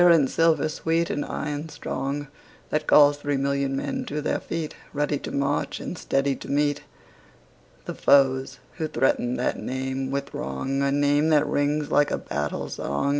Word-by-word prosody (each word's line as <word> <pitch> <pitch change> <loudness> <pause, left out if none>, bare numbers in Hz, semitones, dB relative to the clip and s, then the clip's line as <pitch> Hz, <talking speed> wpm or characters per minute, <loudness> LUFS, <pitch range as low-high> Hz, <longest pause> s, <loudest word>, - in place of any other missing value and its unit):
And 170 -5 +6
silver 165 +1 +2
sweet, 165 +2 0
and 145 - -1
iron 150 +1 -4
strong, 140 0 -4 0.5
That 155 0 0
calls 145 -1 +6
three 145 -1 -1
million 140 0 0
men 265 - -2
to 150 - -3
their 150 - -1
feet, 160 -2 -4 0.2
Ready 145 0 0
to - - -6
march, 140 +1 -1
and - - -5
steady 135 -4 0
to - - -10
meet 145 0 +1 1.0
The - - -4
foes 135 -1 +3 0.2
who 160 - -1
threaten 125 -4 +1
that 125 - -1
name 130 +1 -3
with 140 0 -3
wrong, 135 - -2
A 140 0 +2
name 145 +2 +3
that 150 -1 +4
rings 145 0 0
like 145 0 +4
a - - 0
battle 75 0 -3
song. 70 - -2
145 Hz, 170 wpm, -25 LUFS, 135-150 Hz, 1.0 s, And